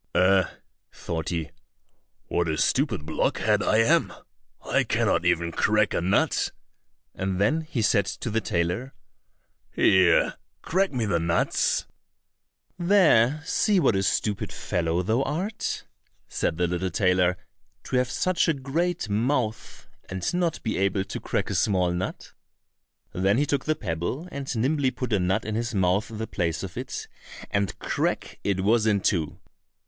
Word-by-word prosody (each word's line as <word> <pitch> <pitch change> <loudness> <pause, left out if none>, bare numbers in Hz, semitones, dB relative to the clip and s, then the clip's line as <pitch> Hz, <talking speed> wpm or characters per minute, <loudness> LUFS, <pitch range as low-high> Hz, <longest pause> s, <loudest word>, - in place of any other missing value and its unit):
"Eh!" 95 0 +4 0.5
thought 80 -1 -4
he, 85 -3 -3 0.7
"what 85 0 0
a 80 - -1
stupid 110 - +1
blockhead - - +1
I 110 - +2
am! - - +3 0.6
I - - +2
cannot - - +1
even 85 0 +1
crack 105 +3 +2
a - - 0
nut!" 95 +4 +1 0.6
and 95 -1 -2
then 150 +11 +2
he 140 -7 -3
said 100 -2 +3
to 115 - -4
the 115 +1 +1
tailor, 90 +8 -2 0.7
"Here, 95 -3 +3 0.3
crack 190 +3 +1
me 125 -5 -1
the 90 -5 +1
nuts." 85 +1 +1 0.9
"There, 160 - +4
see 205 +2 +2
what 115 - +3
a 95 - +1
stupid 100 +1 -1
fellow 85 +1 -1
thou 110 +7 +1
art!" 175 +10 -3 0.4
said 80 - -2
the 90 - +2
little 90 +2 -1
tailor, 90 -1 +2 0.5
"to 130 - -1
have 125 -1 +1
such 185 +5 +1
a 165 - +2
great 165 +4 -1
mouth, 115 +2 -2 0.2
and 95 - -2
not 175 -2 -1
be 110 -4 -1
able 95 0 +1
to 95 - -6
crack - - -2
a - - -1
small 90 -4 +2
nut!" 90 +1 -5 0.8
Then 95 +4 +2
he 145 - +2
took 140 -2 -1
the 155 - +1
pebble 100 - -3
and 140 -1 -6
nimbly 135 +4 +1
put 125 -2 -4
a 100 - +3
nut 95 +4 0
in 110 - -3
his 115 +1 -2
mouth 95 +3 +1
in 110 - -8
the 110 - -3
place 85 -6 -2
of - - -7
it, - - -5 0.4
and 100 -1 -1
crack, - - -2
it 100 -2 0
was 110 +3 +3
in 100 -2 +2
two! 85 -7 0
105 Hz, 155 wpm, -25 LUFS, 90-130 Hz, 0.9 s, Eh